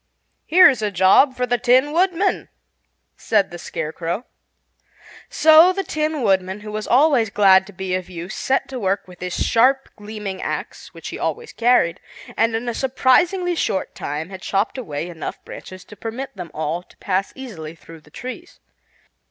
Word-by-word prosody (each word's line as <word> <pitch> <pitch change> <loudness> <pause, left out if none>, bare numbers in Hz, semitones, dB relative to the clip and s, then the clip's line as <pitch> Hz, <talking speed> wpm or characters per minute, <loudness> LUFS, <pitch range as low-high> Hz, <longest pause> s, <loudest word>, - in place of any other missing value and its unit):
"Here's 340 -8 +6
a 210 - 0
job 195 +8 +4
for 250 - 0
the 245 -1 0
Tin 255 +5 +3
Woodman," 370 +3 +1 0.7
said 205 -4 +1
the 175 - -8
Scarecrow. 165 +6 -4 1.0
So 320 +3 +6
the 390 +1 -2
Tin 310 -4 -2
Woodman, 190 0 +1
who 210 0 -8
was 215 0 -4
always 260 -4 +4
glad 190 -2 +5
to - - -11
be 190 -1 -5
of 185 -1 -3
use, 175 +1 -7
set 270 - -1
to 260 -2 -5
work 195 -1 -1
with 180 -1 -14
his 180 0 -4
sharp, 265 +4 +3
gleaming 210 -2 -7
axe, - - -5
which - - -9
he - - -7
always 470 -1 -3
carried, 235 -8 +2 0.4
and 225 0 +1
in 230 +2 -3
a 240 - -1
surprisingly 335 +9 +2
short 195 - -2
time 150 +5 -5
had 190 -1 -9
chopped 200 +7 -1
away 160 - -5
enough 170 -3 -7
branches 185 -1 -10
to 210 - -13
permit 230 +5 -6
them 180 -3 -7
all 155 +2 -3
to 180 - -24
pass 195 0 -1
easily 175 -12 -8
through 165 0 -14
the 150 - -21
trees. 250 +11 -9
210 Hz, 170 wpm, -21 LUFS, 185-265 Hz, 1.0 s, Here's